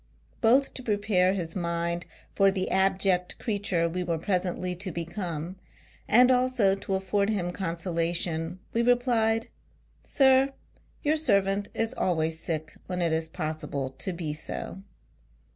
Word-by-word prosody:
Both 260 +5 +4
to - - -6
prepare 205 -5 +2
his 170 -4 -3
mind 170 -1 -2 0.3
for 195 0 +4
the 190 -1 -2
abject 190 -1 +2
creature 200 -6 0
we 180 +2 -2
were 170 -2 -1
pre 190 +5 -2
sently 180 0 -1
to 190 -1 -4
become, 170 0 -4 0.5
and 250 +3 +6
also 250 -6 +3
to 195 - -6
aiford 195 +2 0
him 185 -5 -1
con 175 -2 -3
solation, 170 0 -1 0.2
we 230 - +2
replied, 235 -2 +2 0.5
"Sir, 270 0 +4 0.5
your 305 +2 +2
servant 200 -7 +2
is 225 +2 0
always 160 -2 0
sick 155 -2 -3
when 180 -1 -3
it 170 -2 +2
is 160 0 -1
possible 155 -5 -4
to 190 - -1
be 165 -4 -4
so." 155 +4 -5
185 Hz, 145 wpm, -27 LUFS, 170-210 Hz, 0.5 s, and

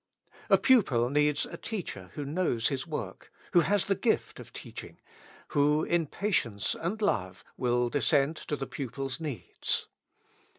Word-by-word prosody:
A - - +7
pupil 135 - +4
needs 150 0 +3
a - - -8
teacher 160 - -5
who 145 - -4
knows 140 -7 +1
his 135 0 -3
work, 115 - -6 0.2
who 175 - +7
has 200 +2 +2
the 200 - +2
gift 220 +4 0
of - - -11
teaching, - - -9 0.5
who 150 +1 +3
in 170 -2 +1
patience 125 - 0
and 185 +6 -3
love 95 - -1
will 125 -1 +1
descend 140 +4 +2
to 150 - 0
the 135 - -4
pupil's 135 +1 -4
needs. 150 -7 -2
145 Hz, 145 wpm, -29 LUFS, 120-170 Hz, 0.5 s, A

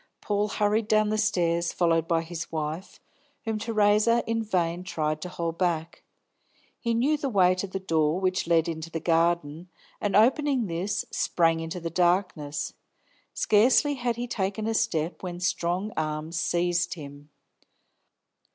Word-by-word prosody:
Paul 205 0 0
hurried 210 +1 0
down 215 -1 +3
the 215 - 0
stairs, 170 -5 +1
followed 165 -2 +1
by 165 -1 +1
his 165 0 -6
wife, 160 +3 -4 0.5
whom 220 -1 -2
Theresa 215 +1 +3
in 225 0 -1
vain 180 -5 -1
tried 155 -4 -2
to 180 - -5
hold 170 -2 -4
back 170 -3 -1 0.8
He 235 -1 -1
knew 280 +7 +2
the 280 -2 -2
way 185 -5 +4
to 185 +2 -3
the 190 0 -4
door 160 -2 +1
which 185 -2 0
led 165 -1 +3
into 160 0 -5
the 165 - -4
garden, 165 0 0 0.3
and 205 -2 0
opening 260 +3 +3
this, 195 +3 -2
sprang 165 -1 +1
into 165 +2 -5
the 165 -1 -5
darkness. 175 -4 0 0.6
Scarcely 245 +7 +4
had 245 -3 -1
he 240 +1 -3
taken 205 -1 -2
a 225 - 0
step, 180 -7 -1
when 175 -2 -5
strong 180 +3 -1
arms 155 +1 -3
seized 175 0 0
him. 145 -2 -11
180 Hz, 150 wpm, -27 LUFS, 165-215 Hz, 0.8 s, way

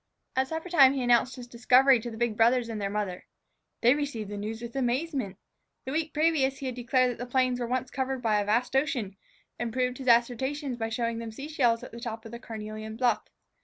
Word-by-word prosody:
At 260 0 +2
suppertime 320 -3 +4
he 265 - -1
announced 245 +1 +3
his 250 -2 -8
discovery 250 +2 +4
to 240 +2 -6
the 225 - -8
big 235 -2 0
brothers 235 +2 +3
and 220 -2 -4
their 200 - -1
mother. 200 -3 -4 0.5
They 240 +2 +6
received 280 -8 -3
the - - -4
news 215 +2 -4
with 235 +1 -8
amazement. 265 - -1 0.5
The 260 - -4
week 315 +1 -1
previous 300 -4 +2
he 275 - -7
had 255 - -2
declared 250 +1 +2
that 240 - -8
the 245 0 -6
plains 255 -1 +1
were 240 - -2
once 255 +1 -2
covered 265 0 -2
by 215 -2 +2
a - - -3
vast 235 +5 0
ocean, 250 -8 0 0.4
and 240 - -1
had 225 - -6
proved 250 0 -1
his 260 - -7
assertion 255 +4 +2
by 225 -1 -3
showing 230 0 -2
them 230 -1 -6
sea 270 +6 -7
shells 240 -7 +2
at - - -9
the 235 - -9
top 230 -1 -6
of 225 - -9
the 235 - -7
carnelian 215 -2 -7
bluff. 245 +1 +2
245 Hz, 230 wpm, -28 LUFS, 225-265 Hz, 0.5 s, They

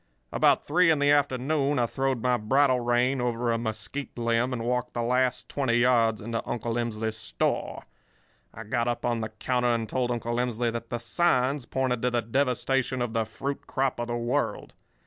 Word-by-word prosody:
"About - - +3
three 175 +3 +4
in 160 - +4
the 145 0 +3
afternoon 145 +1 +1
I 120 - +3
throwed 130 0 -1
my 125 -1 +3
bridle 130 +3 +3
rein 120 +2 +1
over 120 -1 0
a 115 - 0
mesquite 115 +5 -5
limb 120 +1 +1
and 120 -3 -3
walked 125 +1 -2
the 120 - -1
last 125 -2 +1
twenty 130 -5 0
yards 120 -3 +3
into 115 +2 -3
Uncle 120 -1 -2
Emsley's 110 -2 -2
store. 110 - -2 0.7
I 110 - -9
got 120 +2 -1
up 120 -1 -2
on 120 -1 0
the 110 - -3
counter 125 +3 0
and 115 -1 -2
told 125 +1 -1
Uncle 120 -1 -2
Emsley 120 -1 0
that 115 0 -6
the 120 - -2
signs 130 0 +1
pointed 130 -3 -1
to 125 - +2
the 120 -1 0
devastation 130 +1 0
of 120 -2 -2
the 115 -1 +1
fruit 135 +6 -5
crop 130 -2 -1
of 120 - -2
the 120 0 -2
world. 120 +1 -2
120 Hz, 190 wpm, -27 LUFS, 115-130 Hz, 0.7 s, three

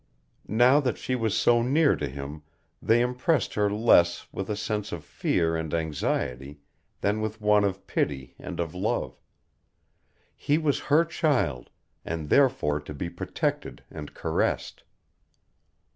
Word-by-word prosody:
Now 125 +6 +5
that 125 -6 -1
she 130 - -3
was 115 -3 0
so 120 +1 +4
near 145 +5 +3
to 75 - -3
him 70 +3 -7 0.4
they 115 +1 +3
impressed 125 +4 0
her 105 -1 +2
less 95 -5 +3
with 95 +1 -5
a 105 - 0
sense 105 -1 -3
of 85 -3 -5
fear 80 0 0
and 80 -1 -3
anxiety 75 -3 -2 0.4
than 105 +2 0
with 110 0 -3
one 105 -1 +4
of 100 -1 -2
pity 65 -3 -2
and - - -7
of 85 -2 -2
love. 90 - -2 1.1
He 145 - +1
was 155 -3 +1
her 155 +4 +5
child, 145 - 0 0.3
and 80 -2 -4
therefore 125 - +3
to 75 0 -9
be 85 +4 -4
protected - - -3
and 75 - -8
caressed. - - -1
105 Hz, 145 wpm, -27 LUFS, 80-125 Hz, 1.1 s, Now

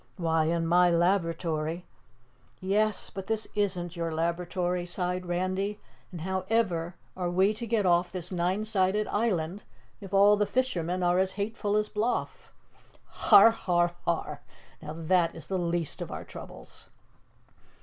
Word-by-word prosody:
Why, 165 -2 +1
in 165 +1 0
my 175 +2 +4
laboratory 170 -2 0 0.4
" 125 -4 -35
"Yes, 210 +3 0
but 195 -1 -7
this 220 -1 -2
isn't 185 -4 -1
your 165 -1 -2
laboratory," 175 +2 -1
sighed 180 0 -3
Randy, 185 +4 -1 0.3
"and 175 -3 -7
how 190 +2 -2
ever 180 -7 0 0.2
are 180 -1 -2
we 190 +4 +3
to 230 +2 -6
get 220 -3 +1
off 175 0 +3
this 180 -1 -5
nine 185 +4 0
sided 210 0 +1
island 195 -4 -1 0.4
if 195 -3 -10
all 200 +1 +6
the 210 0 +1
fishermen 185 -9 -1
are 175 +1 +3
as 190 0 +1
hateful 210 0 -1
as 210 0 +1
Bloff?" 220 +4 -2 0.5
"Har! 205 +3 +6
har! 175 -5 0
har! 150 -3 -2 0.4
Now 155 -1 -6
that 165 +1 +1
is 165 - -8
the 190 -1 -2
least 170 -2 -2
of - - -5
our - - -5
troubles." - - -12
180 Hz, 150 wpm, -28 LUFS, 170-200 Hz, 0.5 s, all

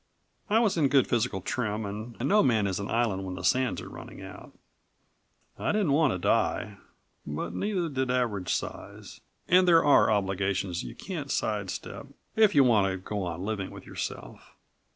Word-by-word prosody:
I 215 - +4
was 225 -6 +2
in 150 -4 +4
good 135 -1 +4
physical 115 -5 0
trim 110 0 -2
and 110 +4 -7
no 210 +5 +5
man 110 -6 +2
is 95 -1 -1
an 100 - -5
island 110 -5 0
when 95 -1 -5
the 95 - -7
sands 130 +5 +1
are - - -9
running - - -10
out. - - -10 1.1
I - - 0
didn't 205 -8 +1
want 145 -1 +3
to - - -1
die, 90 - 0 0.5
but 75 +1 -5
neither 195 -4 -1
did 130 -4 -2
Average 115 -7 0
Size - - -5 0.3
and 180 +1 +5
there 165 -3 +6
are 145 - +5
obligations 95 -3 0
you - - -8
can't 160 -8 -6
sidestep 105 -6 -3 0.3
if 220 -5 +4
you 140 - +7
want 110 -6 +4
to 95 - -3
go 100 +2 -4
on 85 +1 -4
living 105 -3 -3
with - - -11
yourself. - - -7
115 Hz, 175 wpm, -28 LUFS, 100-145 Hz, 1.1 s, you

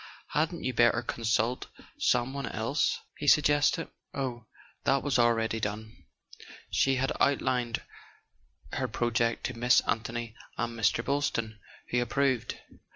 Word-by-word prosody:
Hadn't 160 +3 -1
you 130 - -1
better 120 0 +4
consult 115 +1 0 0.3
some 125 +2 +2
one 140 -3 -3
else?" 115 +9 0 0.2
he 145 - -4
suggested. 145 +2 +4 0.3
Oh, 125 -5 -3 0.4
that 135 0 +2
was 135 -3 +1
already 115 -1 +2
done: 110 +1 -5 0.7
she 135 0 +3
had 135 +1 0
outlined 125 -4 +1 0.9
her 130 - -1
project 115 0 0
to 130 - -2
Miss 125 +2 +5
Anthony 115 0 -3 0.2
and 120 -1 -2
Mr. 115 +1 +1
Boylston, 115 -6 -1 0.3
who 125 0 +2
ap¬ 120 - -9
proved. 130 -4 +1
120 Hz, 130 wpm, -29 LUFS, 115-135 Hz, 0.9 s, Miss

